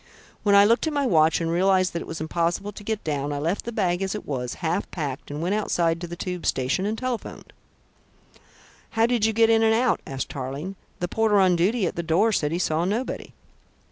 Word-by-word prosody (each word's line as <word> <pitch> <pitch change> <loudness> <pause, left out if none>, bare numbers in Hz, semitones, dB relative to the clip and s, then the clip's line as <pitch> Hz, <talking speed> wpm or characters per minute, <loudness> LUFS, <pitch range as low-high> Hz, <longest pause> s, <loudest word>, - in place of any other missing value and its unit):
When 200 -1 +3
I 200 0 +8
looked 230 +8 +3
at 315 - -1
my 285 -1 +1
watch, 160 -7 +4
and 165 -1 -1
realised 185 0 +2
that 170 - -3
it - - -8
was 165 - -6
impossible 170 +5 -1
to 205 - -11
get 220 0 -3
down, 145 -2 -2
I 145 - -2
left 165 +7 -2
the 235 - -4
bag 185 -5 0
as 195 +1 -2
it 210 - -6
was, 125 -3 -3
half 175 +3 -2
packed 145 -6 -5
and 145 +2 -4
went 180 +3 0
outside 170 -5 0
to 175 - -4
the 170 - -6
tube 180 0 -5
station 135 +10 0
and 220 +1 -2
telephoned." 255 -2 -5 1.4
"How 225 - +5
did 235 -2 +1
you - - +1
get 225 +1 +4
in 225 0 +4
and 220 0 +4
out?" 245 +1 +2
asked 135 -1 -4
Tarling. 140 +8 -5 0.3
"The 175 - 0
porter 215 +1 +2
on 185 -2 +4
duty 195 +5 +1
at - - -2
the - - 0
door 170 +7 +2
said 150 -7 0
he 170 - 0
saw 165 -2 0
nobody." 215 +8 -3
180 Hz, 230 wpm, -24 LUFS, 165-215 Hz, 1.4 s, I